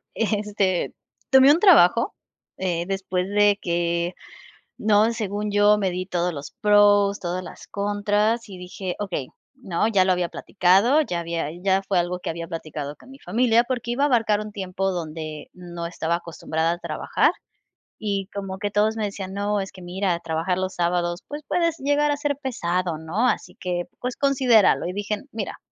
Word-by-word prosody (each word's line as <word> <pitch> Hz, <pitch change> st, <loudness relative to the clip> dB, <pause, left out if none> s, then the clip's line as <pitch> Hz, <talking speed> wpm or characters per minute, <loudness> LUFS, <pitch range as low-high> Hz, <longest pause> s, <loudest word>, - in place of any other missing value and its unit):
eh, 225 Hz, -, +1 dB
este, 200 Hz, -3 st, -1 dB, 0.4 s
tomé 265 Hz, +1 st, +8 dB
un 315 Hz, -, +4 dB
trabajo, 270 Hz, -, +5 dB, 0.4 s
eh, 175 Hz, -2 st, -1 dB
después 190 Hz, -1 st, -2 dB
de 205 Hz, 0 st, +4 dB
que 170 Hz, 0 st, -1 dB, 0.7 s
¿no?, 215 Hz, +1 st, +3 dB
según 210 Hz, -2 st, -3 dB
yo, 205 Hz, +1 st, +4 dB
me 195 Hz, -2 st, 0 dB
di 180 Hz, +1 st, -4 dB
todos 180 Hz, -1 st, -1 dB
los 145 Hz, -2 st, -7 dB
pros, 205 Hz, -1 st, +5 dB
todas 180 Hz, +1 st, -3 dB
las 175 Hz, -, -11 dB
contras 205 Hz, +3 st, 0 dB
y 190 Hz, -2 st, -9 dB
dije: 180 Hz, 0 st, -5 dB
"Okey", 180 Hz, -10 st, -3 dB, 0.3 s
¿no?, 215 Hz, -6 st, -1 dB
ya 200 Hz, -4 st, +3 dB
lo 185 Hz, -, +3 dB
había 180 Hz, -1 st, 0 dB
platicado, 195 Hz, -, +3 dB
ya 175 Hz, -, -3 dB
había 170 Hz, -2 st, -3 dB
ya 195 Hz, 0 st, +2 dB
fue 195 Hz, -2 st, 0 dB
algo 175 Hz, +1 st, -1 dB
que -, -, -4 dB
había 165 Hz, 0 st, -5 dB
platicado 155 Hz, -3 st, -6 dB
con 260 Hz, -, -17 dB
mi 270 Hz, -, -13 dB
familia 235 Hz, +3 st, +2 dB
porque 245 Hz, -1 st, -3 dB
iba 275 Hz, +4 st, +1 dB
a -, -, +5 dB
abarcar 225 Hz, -6 st, +2 dB
un 210 Hz, 0 st, -7 dB
tiempo 195 Hz, -1 st, -2 dB
donde 155 Hz, -3 st, -5 dB
no 175 Hz, -2 st, -7 dB
estaba 170 Hz, 0 st, -1 dB
acostumbrada 165 Hz, -1 st, -2 dB
a 175 Hz, -, -4 dB
trabajar, -, -, +1 dB, 0.7 s
y 200 Hz, -3 st, -2 dB
como 195 Hz, -1 st, -5 dB
que 205 Hz, 0 st, -2 dB
todos 210 Hz, +2 st, +2 dB
me 220 Hz, -, -1 dB
decían: 195 Hz, -2 st, -5 dB
"No, 205 Hz, +1 st, 0 dB
es 195 Hz, -, -5 dB
que 185 Hz, -, -12 dB
mira, 180 Hz, 0 st, -1 dB
trabajar 165 Hz, +3 st, -1 dB
los 185 Hz, 0 st, -2 dB
sábados, 175 Hz, 0 st, 0 dB
pues, 295 Hz, +1 st, -6 dB
puedes 335 Hz, -2 st, +1 dB
llegar 290 Hz, +2 st, +2 dB
a 290 Hz, -, +1 dB
ser 290 Hz, -1 st, -1 dB
pesado, 180 Hz, -9 st, -1 dB
¿no?, 175 Hz, +10 st, 0 dB
así -, -, -2 dB
que, 175 Hz, -1 st, -2 dB, 0.2 s
pues, 250 Hz, 0 st, -3 dB
considéralo", 260 Hz, -6 st, +4 dB
y 180 Hz, -, -3 dB
dije: 205 Hz, +1 st, -3 dB
"Mira, 215 Hz, -3 st, -5 dB
195 Hz, 180 wpm, -23 LUFS, 175-215 Hz, 0.7 s, tomé